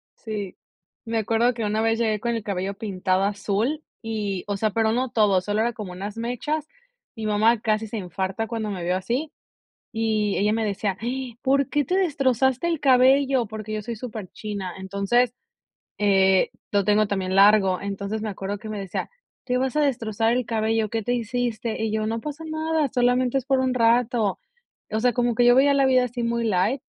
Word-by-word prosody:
Sí, 210 -4 -6 0.5
me 225 0 -2
acuerdo 225 +3 +2
que 230 -1 -4
una 215 +1 0
vez 225 0 +1
llegué 220 -3 +1
con 235 +1 -1
el 225 - -3
cabello 195 -1 -2
pintado 190 -3 -1
azul 210 +9 -1 0.2
y 210 -5 -3
o 205 - -2
sea, 215 +2 +1
pero 220 +1 +1
no 250 +3 0
todo, 205 -5 +3
solo 205 +3 -1
era 235 +1 0
como 210 -4 -7
unas 200 +4 -6
mechas. 250 +7 -3 0.5
Mi 220 - -5
mamá 215 +2 +3
casi 215 0 0
se 225 - -5
infarta 190 +3 -3
cuando 225 -2 -3
me 185 -4 -4
vio 180 +1 0
así, 250 +11 -2 0.6
y 220 -2 0
ella 210 +2 +2
me 225 0 0
decía: 200 -2 -1
"Ay, 245 0 -4
¿por 275 0 +2
qué 295 -1 +1
te 365 - 0
destrozaste 265 - +1
el 330 -3 -1
cabello?". 265 -1 +4
Porque 215 0 -7
yo 215 - -3
soy 230 +2 -5
superchina, 210 -4 -6
entonces, 200 +6 +1 0.7
eh, 190 -2 +4 0.2
lo 200 -1 +2
tengo 210 +2 +3
también 190 -2 -2
largo. 195 -2 +5
Entonces, 200 +2 -4
me 220 - -2
acuerdo 195 +1 -4
que 215 - -9
me 215 -1 -4
decía: 195 -2 -4 0.4
"¿Te 250 -1 0
vas 265 +2 -1
a - - +3
destrozar 230 -5 0
el 250 0 0
cabello, 220 -1 0
qué 225 -1 -2
te 245 +4 0
hiciste?". 235 -1 -2
Y 220 - 0
yo: 215 0 0
"No 225 +1 -2
pasa 300 +4 -6
nada, 315 -1 0
solamente 250 0 +2
es 265 - -5
por 270 -1 +2
un 260 -1 +1
rato". 230 -3 +2 0.5
O 220 - 0
sea, 245 +1 +3
como 240 0 +1
que 245 - +3
yo 245 - +7
veía 280 +2 +5
la 275 -1 +4
vida 255 -1 +4
así 245 0 -4
muy 235 0 0
light. 215 +5 +1
225 Hz, 200 wpm, -24 LUFS, 205-245 Hz, 0.7 s, yo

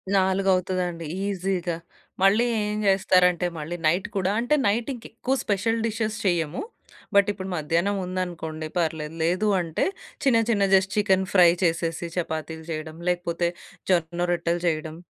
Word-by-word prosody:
4 190 0 +2
అవుతదండి 180 -2 -1 0.2
ఈజీగా. 185 -3 -1 0.5
మళ్ళీ 205 +5 +5 0.2
ఏం 210 0 -2
చేస్తారంటే 185 -2 +4
మళ్ళీ 155 +3 -4
నైట్ 175 +5 +1
కూడా 190 0 +1
అంటే 245 +6 +2
నైట్ 225 +6 0
ఇంకెక్కువ 245 +1 -4
స్పెషల్ 225 +3 0
డిషెస్ 220 -1 -2
చేయము. 170 -4 0 0.5
బట్ 200 0 +6
ఇప్పుడు 190 -1 -6
మధ్యాహ్నం 170 +6 0
ఉందనుకోండి 170 -4 -4
పర్లేదు. 160 -2 -1
లేదు 180 +6 +1
అంటే 165 -2 -1 0.4
చిన్న 255 -4 +5
చిన్న 205 -4 +2
జస్ట్ 190 0 +2
చికెన్ 190 -2 +3
ఫ్రై 180 -3 +7
చేసేసి 165 0 0
చపాతీలు 160 -2 -4
చేయడం. 155 0 -5
లేకపోతే 175 -1 0 0.4
జొన్న 170 -1 +1
రొట్టెలు 170 0 0
చేయడం. 155 -1 -1
180 Hz, 135 wpm, -25 LUFS, 165-195 Hz, 0.5 s, ఫ్రై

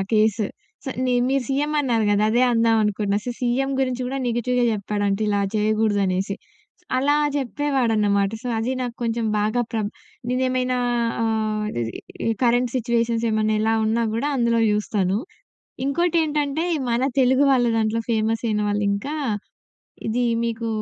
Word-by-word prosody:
ఆ - - +1
case. 215 0 +3 0.4
So 265 - -3
ని 255 - +1 0.2
మీరు 275 0 +1
సీఎం 290 +3 0
అన్నారు 235 -6 +1
గదా! 205 +1 +3
అదే 240 +3 +3
అందామనుకున్నా. 215 -3 +2
సో 245 - -3
సీఎం 255 +3 0
గురించి 255 -1 -1
గూడా 270 +2 -3
నెగెటివ్‌గా 245 +1 +1
చెప్పాడంట 205 -1 -1
ఇలా 205 -1 +1
జేయగూడదనేసి. 205 -3 +1 0.6
అలా 280 +3 +3 0.2
జేప్పేవాడన్నమాట. 235 -8 +1
సో 250 - -4
అది 230 +4 -1
నాకొంచెం 235 -2 -2
బాగా 215 +4 +1
ప్రబ్ 215 -2 -1 0.4
నేనేమైనా 255 0 0 0.4
ఆహ్, 215 -1 0 0.2
ఇది 170 - -4
కరెంట్ 245 0 +3
సిట్యుయేషన్స్ 235 -1 0
ఏమన్నా 215 0 +1
ఎలా 225 +1 +2
ఉన్నా 225 +2 +1
గూడా 235 +6 0
అందులో 235 -2 +2
చూస్తాను. 205 -2 0 0.7
ఇంకోటేంటంటే 305 -1 +1 0.3
మన 235 +1 +1 0.2
తెలుగు 260 +2 +4
వాళ్ళ 245 -2 +3
దాంట్లో 220 0 +1
ఫేమసైన 225 -1 0
వాళ్ళింకా 205 +6 -1 0.9
ఇది 245 +3 +1 0.2
మీకు 230 0 -2
230 Hz, 130 wpm, -23 LUFS, 215-255 Hz, 0.9 s, తెలుగు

